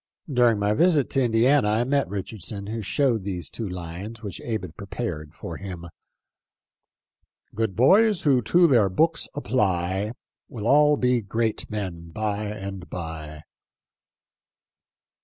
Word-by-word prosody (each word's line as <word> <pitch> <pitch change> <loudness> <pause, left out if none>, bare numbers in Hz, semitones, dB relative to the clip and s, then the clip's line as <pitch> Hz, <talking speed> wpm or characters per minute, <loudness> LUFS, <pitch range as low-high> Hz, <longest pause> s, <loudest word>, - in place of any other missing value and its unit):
During 120 -3 +4
my 105 +1 +1
visit 160 0 +3
to 135 - +2
Indiana 120 +2 +3
I 110 +3 +2
met 140 +2 0
Richardson, 100 0 -5
who 110 +2 -4
showed 115 0 +1
these 90 -3 -4
two 110 -4 -4
lines, 90 +6 -7
which 100 -4 -6
Abe 110 -4 -3
had 80 -4 -9
prepared 85 -6 -5
for 85 - -7
him: 90 -3 -7 0.8
" - - -69 0.7
Good 110 -3 -1
boys 195 - +4
who 135 -4 +4
to 175 +10 +4
their 120 - +4
books 160 - +1
apply 100 -6 0 0.4
Will 110 -4 -6
all 150 +3 +5
be 125 -2 +2
great 110 +2 -1
men 90 -6 -5
by 105 +2 -2
and 100 -3 -6
by." 80 -3 -7
105 Hz, 140 wpm, -25 LUFS, 95-125 Hz, 0.8 s, all